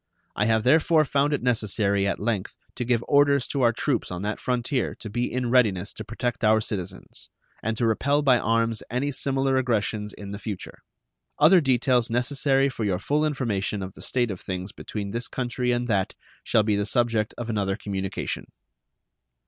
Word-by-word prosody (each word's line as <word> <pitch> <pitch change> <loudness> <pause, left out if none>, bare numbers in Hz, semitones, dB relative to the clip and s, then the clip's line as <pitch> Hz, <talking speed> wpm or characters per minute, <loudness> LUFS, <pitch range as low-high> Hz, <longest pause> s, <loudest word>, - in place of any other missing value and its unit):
I 105 - +1
have 110 0 +2
therefore 155 +4 +4
found 140 +1 +1
it 145 - -1
necessary 105 -4 +1
at 100 - -1
length 105 -3 -2 0.2
to - - -3
give 120 -1 +1
orders 140 -2 +4
to 140 - -1
our 120 -2 +5
troops - - -1
on 90 +1 -5
that 105 +1 -2
frontier 125 0 -1
to 110 - -8
be 120 +3 -1
in 125 -1 -1
readiness 100 -7 +2
to - - -6
protect 120 +1 -3
our 110 0 +5
citizens, 95 -4 -5 0.3
and 110 +1 -2
to 120 - +1
repel 140 +6 +2
by 130 -3 +5
arms 115 0 +1
any 130 +4 -1
similar 135 -1 0
aggressions 110 -4 0
in 100 0 -7
future. 105 -3 -6 0.6
Other 185 -2 +6
details 125 -3 +2
necessary 135 +3 +2
for 130 -4 -4
your 95 -4 +1
full 145 +10 0
information 110 -9 -1
of 95 0 -7
the - - -13
state 120 -4 0
of 95 - -7
things 95 +1 -5
between 100 -1 -6
this 115 +3 -3
country 125 -1 -2
and 120 0 0
that 100 -5 0 0.3
shall 110 - +3
be 105 -1 +1
the 100 0 -1
subject 115 -2 +1
of 120 - -5
another 100 -4 0
communication. 95 -3 -4
115 Hz, 180 wpm, -25 LUFS, 105-130 Hz, 0.6 s, Other